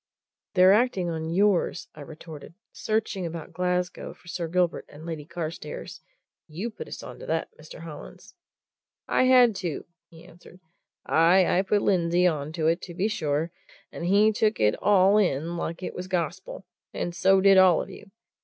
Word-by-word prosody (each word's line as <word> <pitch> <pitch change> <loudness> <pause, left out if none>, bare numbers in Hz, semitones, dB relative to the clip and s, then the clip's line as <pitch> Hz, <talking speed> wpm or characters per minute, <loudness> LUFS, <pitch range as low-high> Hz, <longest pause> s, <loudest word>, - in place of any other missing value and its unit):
"They're 185 +1 +7
acting 205 -6 +1
on 160 0 -4
yours," 195 +1 +1
I 150 - -12
retorted. 155 +2 -11 0.2
"Searching 215 -3 -2
about 165 -1 -7
Glasgow 180 +1 -2
for - - -23
Sir 170 -1 -4
Gilbert 175 0 0
and 150 +2 -12
Lady 160 -3 -6
Carstairs 170 - -7 0.5
you 180 +9 -5
put 470 - -9
us - - -8
on - - -10
to - - -10
that, - - -1
Mr. - - -12
Hollins." - - -11 0.7
"I - - +2
had 250 -4 +5
to," 170 -6 -4 0.2
he 165 0 -16
answered. 175 +1 -17 0.5
"Aye, 175 +4 +4
I - - +4
put 205 +1 0
Lindsey 175 -1 +2
on 155 -4 0
to 160 -1 -2
it, 165 +2 +2
to 175 - -9
be 195 +4 0
sure 160 -6 -2 0.4
and - - -7
he 205 +4 +4
took 215 0 0
it 105 0 +3
all 200 0 +4
in 170 -3 0
like 170 +1 -5
it - - -4
was 180 +1 -6
gospel, 185 +1 -4 0.3
and 175 - -3
so 190 +1 +4
did 195 0 +6
all 185 -3 +6
of - - -6
you! 205 - -13
180 Hz, 175 wpm, -26 LUFS, 165-195 Hz, 0.7 s, They're